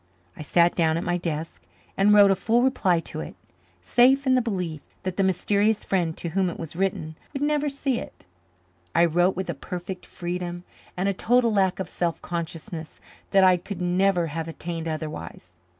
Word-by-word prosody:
I - - -9
sat 170 +3 +3
down 160 -2 +2
at 170 - -2
my 175 - 0
desk 160 - -4 0.3
and 200 +2 +4
wrote 205 -1 +7
a - - +4
full 230 +5 +2
reply 190 -10 +2
to - - -7
it. 75 - -7 0.5
Safe 260 - +4
in 260 - +4
the 255 - +4
belief 180 -9 -3 0.2
that 185 -1 -3
the 195 - +1
mysterious 200 +3 +1
friend 170 -4 0
to 170 - -4
whom 185 +2 +1
it - - -7
was 165 -1 -7
written 170 -4 -2 0.2
would 280 0 -2
never 295 0 +1
see 275 -3 -1
it, - - -11 0.7
I 170 - +6
wrote 175 +3 +2
with 190 +1 -3
a 170 - -2
perfect 180 +5 -7
freedom 175 0 -5 0.3
and 185 +2 0
a 200 - +2
total 235 +3 +2
lack 190 -2 +2
of 190 - -3
self 170 -2 -2
consciousness 165 0 -6 0.3
that 195 -1 +5
I 185 -1 +6
could 185 +1 -7
never 180 0 +2
have 165 +1 -4
attained 165 0 -5
otherwise. 155 - -6
180 Hz, 190 wpm, -25 LUFS, 165-200 Hz, 0.7 s, wrote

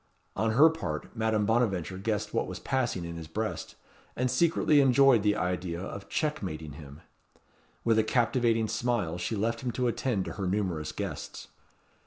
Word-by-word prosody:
On 110 0 +1
her 145 +7 +8
part, 140 - -3
Madame 110 -2 +1
Bonaventure 100 -6 0
guessed 105 0 -2
what - - 0
was - - -5
passing 120 -10 -1
in 85 0 -6
his 80 -1 -7
breast, 110 +7 -4 0.4
and 125 0 0
secretly 155 -3 +4
enjoyed 135 -3 +5
the 105 0 +2
idea 90 -3 -2
of 100 +2 -7
checkmating 95 - -2
him. 70 0 -11 0.8
With 115 -1 +3
a - - +4
captivating 115 -1 +2
smile 110 -7 -1
she 110 - -2
left 115 +3 -1
him 130 - -2
to 125 -1 0
attend 115 -4 -1
to - - -5
her 95 -3 -3
numerous 90 -5 -1
guests. - - -6
110 Hz, 165 wpm, -29 LUFS, 90-120 Hz, 0.8 s, her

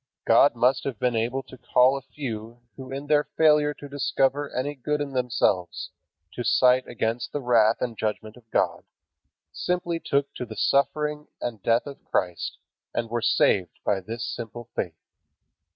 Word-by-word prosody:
God 120 +4 +6
must 130 +3 +3
have 135 -5 -3
been 125 +2 0
able 120 +4 -1
to 130 - -14
call 130 +2 +4
a 135 - -4
few 120 -4 -7
who 130 -1 -9
in 135 +2 -5
their 150 0 +3
failure 150 -2 +5
to 145 - -10
discover 140 0 0
any 140 +3 -2
good 150 +2 -2
in 145 -1 -3
themselves 115 -8 0 0.4
to 120 - -4
cite 125 +1 +4
against 115 +1 -2
the 145 - -2
wrath 115 -4 +3
and 120 -2 -2
judgment 110 0 -3
of 120 -2 -19
God, - - 0 0.7
simply 175 -2 -1
took 140 -3 0
to 125 - -4
the 110 - -8
suffering 150 +3 +1
and 115 -4 -4
death 115 +3 +2
of 140 -1 -9
Christ, 90 -2 -1 0.4
and 115 -1 -2
were 120 0 0
saved 100 -4 +2
by 100 -2 +2
this 115 +5 -5
simple 120 0 -7
faith. 85 -4 -3
125 Hz, 170 wpm, -26 LUFS, 115-140 Hz, 0.7 s, God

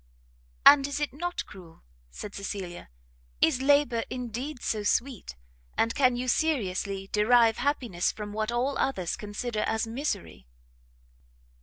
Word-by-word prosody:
"And 280 -1 +8
is 285 0 -3
it 295 -3 -2
not 350 +5 -3
cruel?" 175 -5 -14 0.3
said 200 - -8
Cecilia, 190 - -6 0.5
"is 250 +10 +3
labour 270 -4 +3
indeed 250 +3 -5
so 215 - -1
sweet? 230 - -1 0.4
and 230 - +2
can 255 -3 +3
you 250 +1 -3
seriously 200 -9 0
derive 225 +1 +4
happiness 245 -9 0
from 210 -1 -7
what 215 +1 -1
all 255 +3 0
others 185 -11 0
consider 215 +1 -4
as 220 +1 0
misery?" 225 - -4
230 Hz, 130 wpm, -28 LUFS, 205-270 Hz, 0.5 s, And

